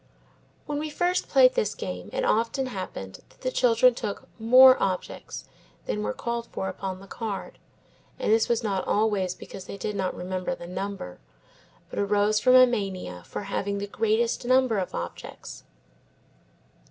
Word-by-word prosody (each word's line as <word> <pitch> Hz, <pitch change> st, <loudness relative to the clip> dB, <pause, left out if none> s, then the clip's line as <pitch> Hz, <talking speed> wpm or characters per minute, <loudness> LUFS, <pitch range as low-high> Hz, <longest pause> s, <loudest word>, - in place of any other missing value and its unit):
When 290 Hz, -1 st, -3 dB
we 310 Hz, +1 st, -3 dB
first 355 Hz, +4 st, 0 dB
played -, -, +6 dB
this 485 Hz, -3 st, 0 dB
game -, -, -6 dB
it -, -, -1 dB
often 230 Hz, -, +1 dB
happened 185 Hz, -, -6 dB
that -, -, -25 dB
the 255 Hz, -, -1 dB
children 250 Hz, 0 st, +4 dB
took 205 Hz, -3 st, -5 dB
more 255 Hz, +3 st, +8 dB
objects 185 Hz, -2 st, -3 dB, 0.4 s
than 105 Hz, 0 st, -2 dB
were 105 Hz, 0 st, -1 dB
called 235 Hz, -, -4 dB
for 190 Hz, -, -4 dB
upon 190 Hz, -1 st, -5 dB
the 195 Hz, -, -12 dB
card, 205 Hz, 0 st, -6 dB, 0.6 s
and -, -, +1 dB
this 225 Hz, 0 st, +3 dB
was 235 Hz, -1 st, +1 dB
not 195 Hz, -3 st, -1 dB
always 205 Hz, -4 st, +1 dB
because 185 Hz, -, -10 dB
they 200 Hz, -, -7 dB
did 210 Hz, +1 st, -3 dB
not 190 Hz, -2 st, -1 dB
remember 185 Hz, +7 st, -3 dB
the 175 Hz, -, -10 dB
number, 185 Hz, -, -5 dB, 0.7 s
but -, -, -4 dB
arose 205 Hz, +1 st, +2 dB
from 255 Hz, +3 st, +5 dB
a 255 Hz, 0 st, +9 dB
mania 195 Hz, -, -3 dB
for -, -, -5 dB
the 200 Hz, -, -8 dB
having 200 Hz, 0 st, -1 dB
the 200 Hz, -, -3 dB
greatest 225 Hz, +4 st, 0 dB
number 255 Hz, -3 st, +3 dB
of 185 Hz, -, -4 dB
objects. 85 Hz, -, -7 dB
210 Hz, 165 wpm, -26 LUFS, 190-250 Hz, 0.7 s, a